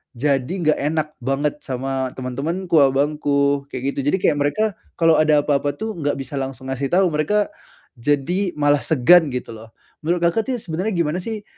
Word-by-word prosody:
jadi 135 +4 0
enggak 155 0 +2
enak 155 +1 0 0.2
banget 145 +3 -1
sama 130 0 -2
teman-temanku, 160 +8 -2
abangku, 140 0 +1
kayak, 130 +2 -2
gitu. - - -3
Jadi, - - +3
kayak 145 - +3
mereka 145 +10 +1 0.4
kalau 165 -1 +5
ada 155 -1 +4
apa-apa, 145 0 +1
tuh, 220 0 -4
enggak 145 -3 -1
bisa 135 +1 -6
langsung 135 -1 -5
ngasih 135 +1 -2
tahu, 190 0 +4
mereka 205 - +1 0.5
jadi 170 +8 0
malah 145 -1 +3
segan, 160 +5 +5
gitu, 125 -2 -4
loh. 110 0 -13 0.3
Menurut 170 +2 0
Kakak, 190 +6 +1
tuh - - 0
ya, - - -9
sebenarnya 185 +6 -2
gimana, 170 +1 0
sih, 215 0 -5
145 Hz, 175 wpm, -21 LUFS, 135-170 Hz, 0.5 s, kalau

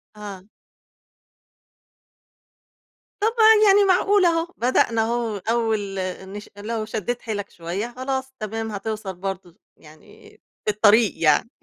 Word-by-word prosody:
آه. 200 -3 -9 2.8
طَب 435 - +3
ع 445 -2 +5
يعني 400 +1 +6
معقولة 380 0 +4
أهو، 330 +1 -2
بدأنا 235 -2 +2
أهو 230 -1 -1
أول 220 -2 -1 0.4
نش 205 +1 -9
لو 215 +1 -4
شدّيت 225 +2 -3
حيلك 205 -3 -4
شوية، 185 +8 -5
خلاص 265 0 -3
تمام، 220 +1 -4
هتوصَل 210 -1 -5
برضه 185 -1 -6 0.2
يعني، 155 0 -17 0.4
في 210 - +2
الطريق 210 +1 +4
يعني، 155 +8 +3
220 Hz, 115 wpm, -23 LUFS, 200-255 Hz, 2.8 s, يعني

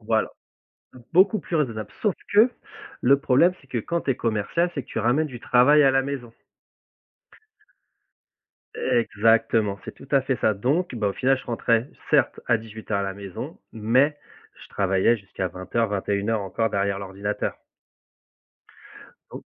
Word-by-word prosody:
Voilà. 110 0 0 0.8
Beaucoup 195 +5 +5
plus 175 - -7
raisonnable, 115 -9 -1
sauf 210 -5 +2 0.2
que 220 +4 +6 0.5
le 140 +3 +5
problème, 145 +7 +4
c'est 135 - -23
que 120 - -2
quand 170 +9 -2
tu 140 - -2
es 125 - 0
commercial, 115 - 0
c'est 140 - -3
que - - -27
tu - - -4
ramènes 130 +8 +1
du 120 -2 -9
travail 140 +5 +5
à 135 - +5
la 135 0 +3
maison. 130 -4 -5 2.4
Exactement, 115 -3 +2
c'est - - -8
tout - - -15
à 135 - +6
fait 135 0 -1
ça 110 - +4
donc 135 - -1
bah, 105 -3 0
au - - -2
final, 135 +1 +2
je - - -12
rentrais, 115 +1 +1 0.2
certes, 145 -4 +3
à 120 -2 +3
18:00 110 -2 -5
à - - -1
la 95 0 -3
maison 100 -2 -8
mais 130 +7 +2 0.4
je - - -14
travaillai 95 +4 +2
jusqu'à 95 -2 -5
20:00-21:00 100 +2 -1
encore 115 +4 -1
derrière 100 0 0
l'ordinateur. 100 +1 -4 1.8
Don - - -8
115 Hz, 155 wpm, -24 LUFS, 105-135 Hz, 2.4 s, que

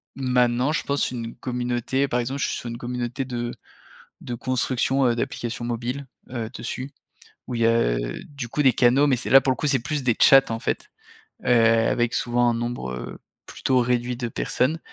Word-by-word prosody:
maintenant 125 0 +2
je 155 - -1
pense 140 -2 0
une 115 -2 -5
communauté 125 +2 -1
par 125 - +1
exemple 130 +3 -3
je - - +1
suis - - -2
sur - - -7
une 115 - -5
communauté 125 +2 -3
de 120 -2 -3 0.7
de 120 - -5
construction, 130 +2 0
heu, 120 - +3
d'applications 120 -1 -3
mobiles, 120 +4 -3 0.2
heu, 120 -3 -4
dessus, 130 +3 -5 0.6
où 125 - -4
il 115 - 0
y - - +5
a, 115 - +3
heu, - - -4
du 140 -5 -7
coup 150 - 0
des 130 -3 +5
canaux 125 +4 +4
mais 130 - +3
c'est 125 - -5
là 135 - +9
pour 135 - 0
le 130 - +1
coup, 150 - -2
c'est 140 -2 +3
plus 150 +1 -3
des 120 -2 +3
chats 135 0 +8
en 115 - -3
fait. - - -3 0.5
Heu, - - -7
avec 115 0 +3
souvent 120 0 +2
un - - +1
nombre, 120 - -3
heu, 65 -1 -6 0.3
plutôt 130 -1 0
réduit 125 0 0
de 120 0 -3
personnes. 140 +7 0
125 Hz, 205 wpm, -24 LUFS, 120-130 Hz, 0.7 s, là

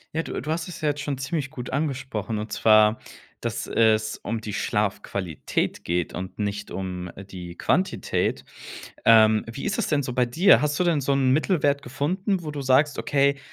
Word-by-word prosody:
Ja, 165 - 0
du - - -5
du 155 - -3
hast 160 +1 -2
es 175 - -8
ja 150 - +2
jetzt 145 0 -2
schon 145 -2 -3
ziemlich 140 +1 -3
gut 125 -1 -7
angesprochen 130 -7 -2
und 105 +1 -5
zwar, 110 0 +4 0.4
dass - - -3
es 110 -1 +2
um 115 +2 -4
die 110 - -5
Schlafqualität 100 -5 -2
geht 85 -1 -1
und 95 +1 -6
nicht 100 -1 -3
um 90 -1 -5 0.2
die 90 -2 -8
Quantität. 185 +7 0 0.6
Ähm, 110 -1 +6
wie 125 +4 -7
ist 205 - -1
es 215 - 0
denn 145 -2 +1
so 125 - -4
bei 125 0 +2
dir? 160 +11 +5
Hast 150 -1 0
du - - +2
denn 170 -4 +2
so 140 +1 0
'n 135 -2 +2
Mittelwert 145 -2 +2
gefunden, 175 - -2
wo 150 - -4
du 145 -1 -5
sagst, 135 +3 +3
okay, 140 -1 +2
130 Hz, 190 wpm, -25 LUFS, 110-150 Hz, 0.6 s, Ähm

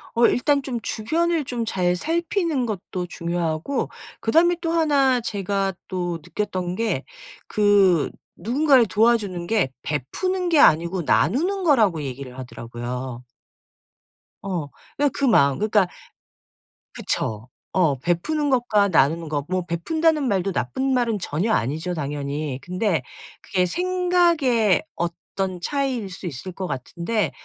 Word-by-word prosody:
어 235 0 +6
일단 280 +3 +2
좀 255 -3 -4
주변을 325 +8 0
좀 240 -2 -3
잘 180 -4 +1
살피는 330 - 0
것도 185 -3 -4
중요하고 170 - -2 0.3
그다음에 335 +9 +3
또 330 -2 -1
1 280 -6 +3
제가 195 -2 -1
또 175 -3 -3
느꼈던 185 -4 -3
게 230 +2 -1 0.4
그 200 -6 +4 0.3
누군가를 260 - +3
도와주는 205 -5 +1
게 205 -12 +1
베푸는 355 - -2
게 315 -4 +4
아니고 170 +4 +4
나누는 370 - +1
거라고 220 - +3
얘기를 130 -1 -7
하더라고요. 125 0 -6 1.2
어. 180 -7 -3 0.5
그 280 - 0
마음 140 - +4
그러니까 210 -3 +3 1.1
그쵸. 110 +2 -3 0.2
어. 160 -8 +2
베푸는 285 - 0
것과 225 -6 +3
나누는 165 -1 +2
것 145 -2 -2
뭐 185 -1 -1
베푼다는 310 - +1
말도 195 -2 0
나쁜 150 - -1
말은 240 -4 +1
전혀 185 +5 -1
아니죠 160 - -1
당연히. 145 -2 -3
근데 180 - 0 0.4
그게 180 -1 0
생각의 340 - +2
어떤 180 +2 -3
차이일 265 -8 -1
수 180 - -8
있을 175 +4 -6
것 185 +1 -5
같은데 170 - -2
195 Hz, 260 characters per minute, -23 LUFS, 165-265 Hz, 1.2 s, 어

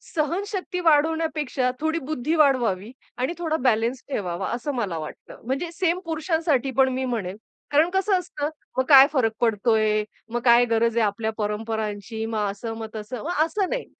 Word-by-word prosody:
सहनशक्ती 365 +4 -2
वाढवण्यापेक्षा 310 -4 +2
थोडी 320 +2 0
बुद्धी 305 +2 -2
वाढवावी 240 -8 +2 0.3
आणि 255 +6 -1
थोडा 325 -2 -1
बॅलन्स 235 0 +1
ठेवावा 185 -6 -2
असं 245 +5 -3
मला 200 -9 -2
वाटतं. 155 -1 -9
म्हणजे 275 +7 -2
सेम 345 +1 0
पुरुषांसाठी 320 -5 0
पण 265 -1 +5
मी 260 0 -1
म्हणेन 210 -6 -3 0.3
कारण 305 +4 +4
कसं 385 0 +2
असतं, 300 -4 -4 0.3
"मग 260 - +3
काय 275 -1 +10
फरक 230 -5 +2
पडतोय? 215 -1 +2 0.3
मग 240 - +1
काय 240 0 +6
गरज 230 0 +1
आहे 225 - +4
आपल्या 220 +2 -1
परंपरांची?" 220 0 -3
मग 215 -2 -1
असं, 225 +3 -6
मग 220 -1 -5
तसं. 220 +5 -6
मग 320 -1 +1
असं 390 +2 -1
नाही. - - -2
255 Hz, 165 wpm, -24 LUFS, 220-315 Hz, 0.3 s, काय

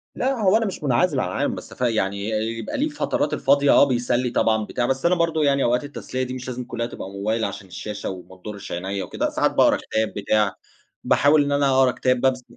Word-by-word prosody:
لأ، 265 +2 0
هو 200 +1 +5
أنا 225 - 0
مش 190 -5 -5
مُنْعزل 140 +2 +2
عن 95 - 0
العالم، - - -1
بس - - -10
ف - - -14
يعني 100 -3 0
يبقى 110 +1 -3
له 275 - +1
الفترات 295 - -1
الفاضية، 140 0 +3
آه - - +7
بيسلّي 125 -2 +1
طبعًا، 110 -2 +1
بتاع، 120 - -2
بس 135 +3 -1
أنا 180 +1 +4
برضه 165 -2 +1
يعني 140 -1 +2
أوقات 125 +2 +1
التسلية 130 -2 -5
دي 125 - -5
مش 130 -1 -7
لازم 125 0 -4
كلها 120 -1 -4
تبقى 95 -4 -7
موبايل، 110 +3 -1
عشان 100 -1 -6
الشاشة 100 +3 -6
وما 95 0 -9
تِضُرِّش 100 +2 -9
عِنَيَّا 95 +3 -3
وكده. - - -2
ساعات - - +1
باقرأ - - +4
كتاب، 110 0 -2
بتاع، 105 -1 +1 0.5
باحاول 145 +1 +4
إن 145 - -2
أنا 140 -1 +2
أقرا 130 -1 +4
كتاب 125 0 0
ببس 130 -1 +1
125 Hz, 220 wpm, -23 LUFS, 105-140 Hz, 0.5 s, آه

